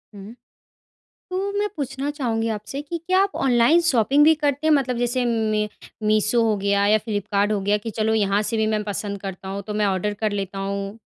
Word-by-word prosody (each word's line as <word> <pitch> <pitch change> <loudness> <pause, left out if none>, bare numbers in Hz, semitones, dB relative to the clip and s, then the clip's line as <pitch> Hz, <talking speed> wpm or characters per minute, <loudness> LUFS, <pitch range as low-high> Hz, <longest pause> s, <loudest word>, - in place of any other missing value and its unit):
हुँ। 200 +3 -10 1.0
तो 385 +2 -2
मैं 415 - +1
पूछना 275 0 -3
चाहूँगी 230 -6 -2
आपसे 215 +6 -4
कि 335 +3 -5
क्या 370 +1 +3
आप 400 - -3
ऑनलाइन 250 +5 +4
शॉपिंग 280 -1 +3
भी 320 - +7
करते 285 +2 +1
हैं 310 - +5
मतलब 255 -4 +1
जैसे 245 +1 0
मै 215 -2 0 0.4
मीशो 215 +2 +3
हो 220 -2 +2
गया 200 0 +1
या 215 +1 +5
फ्लिपकार्ट 205 -1 -1
हो 210 - +1
गया 205 +2 +2
कि - - -2
चलो 220 +1 +2
यहाँ 205 -1 +2
से 225 - 0
भी 220 0 +1
मैं 210 - -2
पसंद 205 -1 -4
करता 190 -1 -7
हूँ 200 +1 -4
तो 210 - -3
मैं 210 0 +1
ऑर्डर 195 +1 0
कर 215 -2 0
लेता 195 -1 -4
हूँ? 200 +2 -4
215 Hz, 210 wpm, -23 LUFS, 205-265 Hz, 1.0 s, भी